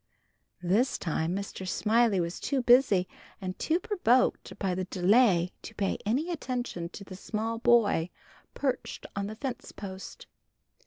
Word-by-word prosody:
This 210 Hz, +9 st, +2 dB
time 165 Hz, +1 st, -1 dB
Mr. 195 Hz, -1 st, -5 dB
Smiley 220 Hz, +1 st, +2 dB
was 170 Hz, 0 st, -2 dB
too 270 Hz, -3 st, -1 dB
busy 240 Hz, -7 st, +5 dB, 0.3 s
and 185 Hz, -1 st, -5 dB
too 330 Hz, +2 st, +1 dB
provoked 300 Hz, -, +1 dB
by 190 Hz, -2 st, -1 dB
the 185 Hz, +1 st, -2 dB
delay 185 Hz, -1 st, +3 dB
to 220 Hz, -, -10 dB
pay 195 Hz, -2 st, -1 dB
any 285 Hz, +11 st, 0 dB
attention 245 Hz, -, -3 dB
to 200 Hz, -, -9 dB
the 190 Hz, -1 st, -10 dB
small 225 Hz, +4 st, -3 dB
boy 225 Hz, -8 st, +3 dB, 0.5 s
perched 265 Hz, -3 st, -2 dB
on 200 Hz, 0 st, -2 dB
the 215 Hz, -, -6 dB
fence 245 Hz, +1 st, -5 dB
post. 190 Hz, -1 st, -8 dB
210 Hz, 145 wpm, -29 LUFS, 185-245 Hz, 0.5 s, busy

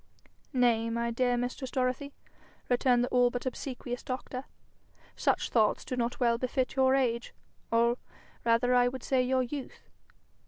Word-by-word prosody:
'Nay, 235 Hz, -4 st, +2 dB
my 235 Hz, +1 st, -1 dB
dear 245 Hz, +1 st, +1 dB
mistress 250 Hz, +2 st, -3 dB
Dorothy!' 255 Hz, +2 st, -1 dB, 0.6 s
returned 245 Hz, 0 st, +3 dB
the -, -, 0 dB
all 245 Hz, -1 st, +4 dB
but 245 Hz, +1 st, -5 dB
obsequious 250 Hz, -1 st, -4 dB
doctor; 255 Hz, 0 st, -5 dB, 0.7 s
'such -, -, 0 dB
thoughts 220 Hz, -3 st, +2 dB
do 255 Hz, -, -3 dB
not 240 Hz, 0 st, -2 dB
well 235 Hz, -2 st, +2 dB
befit 255 Hz, +1 st, -1 dB
your 265 Hz, 0 st, +4 dB
age, 240 Hz, -3 st, 0 dB, 0.4 s
or 235 Hz, +1 st, +3 dB, 0.4 s
rather, 235 Hz, +2 st, +3 dB
I 245 Hz, 0 st, +5 dB
would 255 Hz, 0 st, -5 dB
say, 260 Hz, -2 st, +2 dB
your 255 Hz, +1 st, +2 dB
youth. 270 Hz, +2 st, -7 dB
245 Hz, 150 wpm, -30 LUFS, 235-255 Hz, 0.7 s, I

